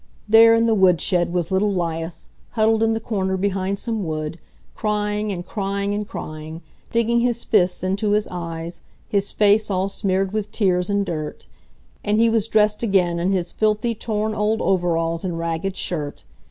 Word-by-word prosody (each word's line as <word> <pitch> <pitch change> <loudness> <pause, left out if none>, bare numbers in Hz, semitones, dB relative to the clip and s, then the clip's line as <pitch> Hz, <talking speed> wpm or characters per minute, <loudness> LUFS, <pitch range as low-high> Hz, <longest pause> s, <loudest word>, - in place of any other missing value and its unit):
There 225 +1 +7
in 230 0 +3
the 225 - +3
woodshed 180 -2 +3
was 175 0 -1
little 200 +2 +2
'Lias, 165 -2 -3 0.2
huddled 220 -1 +2
in 225 0 +3
the 225 - -1
corner 190 -4 -1
behind 195 0 -1
some 225 0 -3
wood, 155 0 -4 0.3
crying 210 0 -1
and 175 -2 -5
crying 200 -1 -2
and 205 0 -3
crying, 155 0 -7 0.3
digging 235 +1 +2
his 240 -1 0
fists 185 -4 +2
into 200 +3 0
his 210 0 +1
eyes, 170 -1 -6 0.3
his 200 -1 0
face 210 +1 +3
all 190 0 0
smeared 195 -1 -1
with 210 -1 -2
tears 185 -4 +1
and 200 0 +1
dirt. 155 -4 -5 0.6
And 210 +1 +1
he 230 0 +4
was 225 -1 +1
dressed 210 -1 +2
again 185 -6 +2
in 180 +3 +1
his 180 -3 -1
filthy, 215 +2 +1
torn 215 -1 -2
old 215 +1 0
overalls 165 -2 0
and 175 -3 -3
ragged 165 +3 -3
shirt. 150 -5 -4
195 Hz, 170 wpm, -22 LUFS, 175-215 Hz, 0.6 s, There